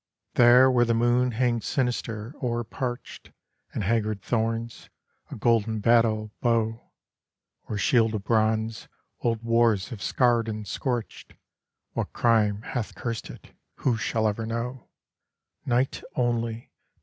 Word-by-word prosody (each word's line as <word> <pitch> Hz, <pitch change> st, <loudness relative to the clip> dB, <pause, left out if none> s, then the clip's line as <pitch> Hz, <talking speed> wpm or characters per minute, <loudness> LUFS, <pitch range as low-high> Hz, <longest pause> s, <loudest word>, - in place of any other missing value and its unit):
II -, -, -64 dB, 0.2 s
There 125 Hz, +2 st, +7 dB
where 120 Hz, -1 st, +4 dB
the 115 Hz, -1 st, +1 dB
moon 120 Hz, +1 st, +2 dB
hangs 120 Hz, -1 st, 0 dB
sinister, 120 Hz, -3 st, -2 dB
o'er 120 Hz, -2 st, -1 dB
parched 120 Hz, +2 st, -6 dB, 0.4 s
And -, -, -3 dB
haggard 110 Hz, 0 st, 0 dB
thorns, 115 Hz, 0 st, -2 dB, 0.4 s
a -, -, -7 dB
golden 110 Hz, -1 st, +1 dB
battle 110 Hz, -1 st, +3 dB
bow, 115 Hz, -2 st, 0 dB, 0.8 s
Or 105 Hz, -, -2 dB
shield 115 Hz, +1 st, +3 dB
of 100 Hz, -, -4 dB
bronze, 110 Hz, 0 st, 0 dB, 0.3 s
old 115 Hz, -1 st, -1 dB
wars 115 Hz, -3 st, +2 dB
have 115 Hz, -6 st, -8 dB
scarred 120 Hz, -3 st, +2 dB
and 105 Hz, -1 st, -5 dB
scorched, 120 Hz, -1 st, -4 dB, 0.6 s
What -, -, -3 dB
crime 110 Hz, -3 st, +2 dB
hath 120 Hz, -4 st, -4 dB
cursed 115 Hz, -2 st, -4 dB
it... -, -, -12 dB, 0.2 s
who 125 Hz, -, +1 dB
shall 110 Hz, 0 st, 0 dB
ever 110 Hz, +2 st, -2 dB
know? 115 Hz, +2 st, -4 dB, 0.8 s
Night 125 Hz, +2 st, +1 dB
only! 115 Hz, -1 st, -1 dB
115 Hz, 130 wpm, -26 LUFS, 110-120 Hz, 0.8 s, There